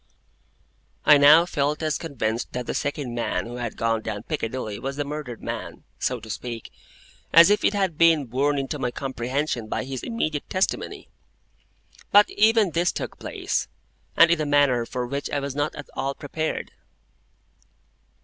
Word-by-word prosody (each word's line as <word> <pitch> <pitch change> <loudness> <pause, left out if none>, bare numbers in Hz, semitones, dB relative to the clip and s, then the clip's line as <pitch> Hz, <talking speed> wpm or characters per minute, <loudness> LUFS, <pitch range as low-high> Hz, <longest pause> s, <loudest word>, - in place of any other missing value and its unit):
I 150 -1 +8
now 150 +4 +8
felt 150 -2 -1
as 155 -1 0
convinced 115 -7 -3
that 125 0 -3
the - - -3
second 145 -4 -3
man 120 -1 -2
who 120 +1 -7
had 120 -2 -5
gone 115 -1 0
down 105 -1 -5
Piccadilly 115 -7 -4
was 135 +1 -4
the 145 - -1
murdered 145 -5 -6
man - - -6 0.2
(so 125 -1 -1
to 110 - -12
speak), 115 +2 -6 0.6
as 170 +4 +8
if 210 0 +2
it 205 - +2
had 190 -6 -1
been 165 -4 +5
borne 140 +4 0
into 140 +2 -3
my 125 - 0
comprehension 130 -1 -3
by - - -2
his 130 -1 -5
immediate 155 -11 -3
testimony. 185 +1 -2 1.0
But 205 +1 +6
even 215 -2 +4
this 170 +2 +1
took - - -6
place, - - -2 0.5
and 170 0 +7
in 170 -2 +2
a - - 0
manner 140 -5 +3
for 125 -1 -3
which 140 +3 -4
I 145 - -1
was 140 -1 -4
not 145 +1 -1
at 145 - -8
all 135 0 -2
prepared. 155 +2 -4
145 Hz, 170 wpm, -24 LUFS, 125-155 Hz, 1.0 s, I